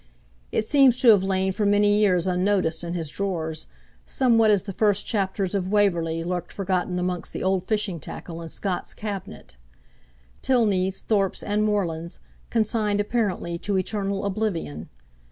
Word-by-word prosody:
It 215 - 0
seems 270 -2 +4
to 245 - +6
have 205 -4 +6
lain 190 0 +1
for 210 - -2
many 205 0 +4
years 185 -5 +3
unnoticed 180 -3 +1
in 170 0 -4
his 160 -4 -3
drawers; 160 -5 -3 0.4
somewhat 230 - +3
as 205 -3 +3
the 200 -1 -6
first 205 0 +1
chapters 195 -3 -1
of 190 -2 -1
'Waverley' 170 -6 +1
lurked 175 0 -3
forgotten 185 -2 -1
amongst 180 -1 -3
the - - -4
old 190 -1 +1
fishing 210 -5 -1
tackle 165 +3 -8
in 165 - -7
Scott's 185 +2 -4
cabinet. 205 - -7 0.8
Tilneys, 195 -7 +1
Thorpes, 200 -3 0
and 210 +1 0
Morlands 170 -5 -1 0.3
consigned 215 -2 +1
apparently 205 -6 -1
to 200 +1 -1
eternal 200 +1 -2
oblivion! 190 - -3
195 Hz, 150 wpm, -24 LUFS, 180-210 Hz, 0.8 s, to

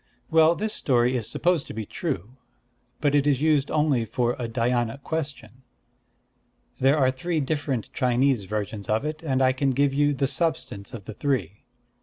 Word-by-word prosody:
Well, 160 +1 +5
this 215 +3 -2
story 125 -1 +2
is 115 -4 -2
supposed 175 -3 +1
to - - -8
be 110 -1 -4
true; 130 - -4 0.6
but 145 -1 +2
it 145 0 +3
is 140 -3 +3
used 150 -2 +2
only 150 -6 +2
for 120 +2 0
a 120 -2 -3
Dhyâna 120 +1 0
question. 140 -7 -5 1.2
There 135 +3 +4
are 130 -3 +3
three 160 +5 -2
different 140 -4 -2
Chinese 125 -3 +2
versions 105 0 -4
of 110 +6 +1
it; 155 +1 -4
and 135 -5 +1
I 130 0 +4
can 135 +1 0
give 140 +1 +2
you 145 +1 +2
the 135 +1 +1
substance 130 - -2
of 100 -5 -9
the 110 - -7
three." 105 - -2
135 Hz, 175 wpm, -25 LUFS, 120-150 Hz, 1.2 s, Well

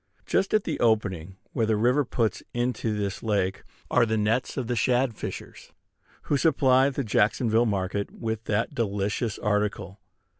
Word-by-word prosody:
Just 195 - +1
at 215 - +2
the 160 - -3
opening 95 -6 0 0.2
where 115 - +1
the 110 - +2
river 125 +7 +3
puts 115 -3 -1
into 120 -3 -1
this 100 -2 -3
lake 100 -4 0 0.3
are - - +4
the 110 -1 +1
nets 110 +6 0
of 130 - -1
the 120 +1 -1
shad 125 +1 +2
fishers, - - -8 0.5
who 145 - +1
supply 135 -3 +4
the 140 0 -3
Jacksonville 115 +2 +2
market 100 0 -1
with 110 -1 -5
that 105 +2 -1
delicious 105 0 -1
article. 105 -2 -1
110 Hz, 155 wpm, -26 LUFS, 105-125 Hz, 0.5 s, are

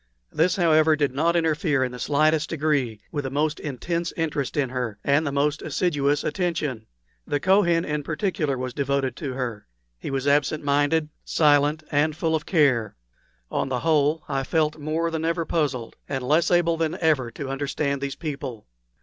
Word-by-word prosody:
This, 170 +3 +2
however, 160 -3 +4
did 145 -3 0
not 165 +5 +1
interfere 155 -4 +1
in 125 - -2
the 125 - -8
slightest 155 +3 +2
degree 140 -9 0
with 145 -3 -2
the 135 - -3
most 150 +3 0
intense 170 +5 -3
interest 150 -4 -2
in 140 -3 +1
her, 125 -4 -3
and 145 +2 +2
the - - -1
most 145 +1 0
assiduous 145 -2 0
attention. 155 - -2 0.4
The 145 - 0
Kohen 175 -1 +3
in 150 0 -2
particular 155 -2 -1
was 125 0 -4
devoted 140 -3 -1
to 140 -5 -4
her. 120 -5 -4 0.3
He - - -5
was 135 0 -2
absent 145 +1 +2
minded, 145 +2 +2
silent, 150 0 +3
and 150 +1 +2
full 160 0 0
of 150 - -3
care. 130 - +2 0.6
On - - -1
the 125 -2 -1
whole, 155 -1 +2
I 135 - -1
felt 155 +2 0
more 160 +3 -1
than 160 -1 -2
ever 165 0 0
puzzled, 140 -9 -1
and 135 -2 -2
less 155 +4 +3
able 170 -2 +3
than 165 +1 -1
ever 150 -7 +2
to 140 +1 -6
understand 140 0 -2
these 140 -1 -3
people. 135 -8 -6
150 Hz, 175 wpm, -24 LUFS, 135-160 Hz, 0.6 s, however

